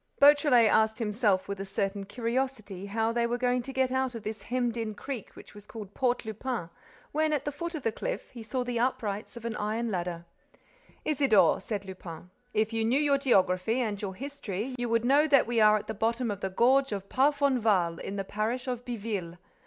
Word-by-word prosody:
Beautrelet 285 -5 +6
asked 220 +1 +3
himself 210 -3 +1
with 200 -1 -4
a - - -2
certain 195 0 -2
curiosity 230 -3 -3
how 225 +2 0
they 235 0 +1
were 240 +1 -1
going 250 0 +1
to 270 - -7
get 260 -1 +1
out 260 -1 0
of 225 - -7
this 215 -1 -5
hemmed 245 +1 -1
in 225 -2 -3
creek 255 -2 -7
which - - -13
was 205 0 -13
called 210 -3 -9
Port 250 -2 0
Lupin, 220 -5 -4 0.4
when, 310 +1 +1
at 295 -3 -1
the 295 - -1
foot 340 +4 -5
of 295 - -5
the 225 - +1
cliff, - - -5
he 240 - -9
saw 235 +3 -2
the 245 -1 -2
uprights 225 -3 -2
of 235 - -9
an 230 -2 -2
iron 220 +2 -1
ladder. 175 -2 -3 0.8
"Isidore," 275 -8 +4
said 205 -3 -4
Lupin, 180 -2 -9 0.2
"if 220 0 0
you 225 0 0
knew 240 +5 +2
your 285 -2 +3
geography 195 -3 +2
and 215 -5 -2
your 190 -2 -4
history, 255 -3 -5
you 245 -1 -3
would 230 0 +1
know 285 +4 +5
that 275 -4 +5
we 235 0 0
are 215 0 +6
at 210 - -6
the 220 - -4
bottom 230 +2 0
of 200 - -5
the 190 - -1
gorge 260 +7 +3
of 200 -1 -4
Parfonval, 245 - +2
in 200 - -5
the 195 - -2
parish 220 +6 -2
of 245 -1 -3
Biville. 205 -8 -4
230 Hz, 210 wpm, -29 LUFS, 205-255 Hz, 0.8 s, Beautrelet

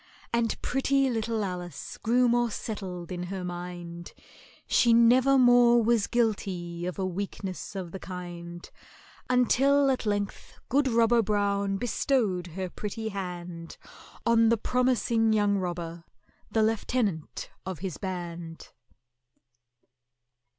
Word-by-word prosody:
And 235 -1 0
pretty 270 0 +2
little 225 -1 -1
ALICE 180 -4 -6
grew 245 +2 +3
more 240 0 +2
settled 185 -6 -6
in 175 -1 -4
her 190 0 -5
mind, 175 -1 -7 0.5
She 235 -1 +4
never 250 +4 +5
more 245 -2 +6
was 225 -2 +2
guilty 180 -7 -1
of 180 - -5
a 190 - -1
weakness 190 +1 -5
of 180 -3 -5
the 190 - -6
kind, 175 -2 -8 0.6
Until 270 +3 +4
at 255 -4 -2
length 205 -1 -3
good 280 +2 +3
ROBBER 230 -1 +4
BROWN 200 -1 0
bestowed 215 -5 0
her 185 +2 -4
pretty 215 +4 -5
hand 175 -4 -6 0.5
On 230 -1 +5
the 230 - +3
promising 235 -2 +2
young 205 -2 +2
robber, 170 -2 -4 0.5
the 220 - +2
lieutenant 215 -6 -1
of 190 -2 -5
his 180 -2 -5
band. 175 -3 -6
205 Hz, 120 wpm, -28 LUFS, 180-235 Hz, 0.6 s, more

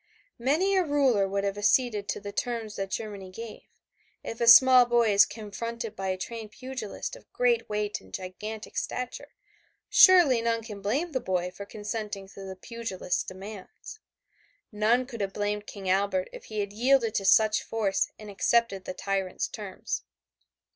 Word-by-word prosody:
Many 320 +11 +2
a 375 - +4
ruler 270 - +2
would 200 +1 -1
have 200 0 -2
acceded 210 -1 +2
to - - -2
the 205 0 -7
terms 230 -2 -3
that 195 0 -3
Germany 200 -3 -5
gave. 225 +4 -9 0.6
If 230 - -6
a 235 - +2
small 255 +1 +9
boy 235 -3 +3
is 200 - +6
confronted 230 +1 -6
by 195 -1 -4
a 185 0 -1
trained 225 +3 -6
pugilist 255 - -6
of - - -17
great - - +1
weight 210 0 -2
and 95 - -18
gigantic 210 - -7
stature, 250 0 -4 0.5
surely 345 - +7
none 230 0 0
can 210 -3 -8
blame 275 - -1
the 260 - -1
boy 180 -6 -1
for 200 +2 -9
consenting 210 -2 -5
to 195 - -11
the 190 - -7
pugilist's 195 -3 -3
demands. 200 - -10 0.7
None 225 +4 +2
could 235 -4 -7
have 195 -1 -2
blamed 205 0 -2
King 195 -2 -8
Albert 190 0 +1
if - - -10
he 215 -1 -3
had 200 0 -5
yielded 240 0 +3
to 195 - 0
such 215 +2 +5
force 210 -4 0
and 215 - -11
accepted 205 -1 +1
the - - -5
tyrant's 195 -1 -2
terms. 205 -4 -5
215 Hz, 170 wpm, -27 LUFS, 200-235 Hz, 0.7 s, small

